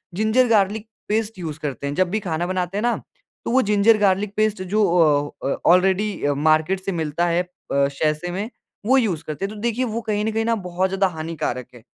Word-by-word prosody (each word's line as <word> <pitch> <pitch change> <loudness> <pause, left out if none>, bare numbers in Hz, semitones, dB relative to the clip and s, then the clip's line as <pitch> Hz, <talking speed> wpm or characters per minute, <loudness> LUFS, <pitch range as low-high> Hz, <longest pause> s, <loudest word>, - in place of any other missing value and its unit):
Ginger, 220 +5 +3
garlic 215 0 +2 0.2
paste 220 0 -1
use 155 -3 -5
करते 140 -3 -4
हैं। 140 - -2
जब 185 +1 +2
भी 215 +4 -1
खाना 175 -3 -2
बनाते 185 +1 -2
हैं - - 0
ना 240 +1 +1 0.5
तो - - -1
वो 260 +2 +4
जिंजर 210 0 +4
गार्लिक 200 0 +1
पेस्ट 215 -2 +1
जो 210 +4 +1
औ 150 -4 +3 0.2
अ, - - 0 0.2
ऑलरेडी 190 +3 +2 0.2
मार्केट 155 +5 +3
से 195 - -1
मिलता 160 -1 -1
है 170 +1 +2
अ, - - -18 0.3
सैशे 150 +4 0
में 200 +5 -3 0.4
वो 260 +4 +4
यूज़ 190 - 0
करते 155 +5 -3
हैं, 200 - -5
तो - - -9
देखिए 235 +2 0
वो 230 0 -3
कहीं 210 -2 -1
न 220 - 0
कहीं 225 +1 -1 0.2
बहुत 180 +1 -1
ज़्यादा 195 +1 +2
हानिकारक 155 -7 -4
है, 120 - -15
190 Hz, 210 wpm, -22 LUFS, 160-215 Hz, 0.5 s, वो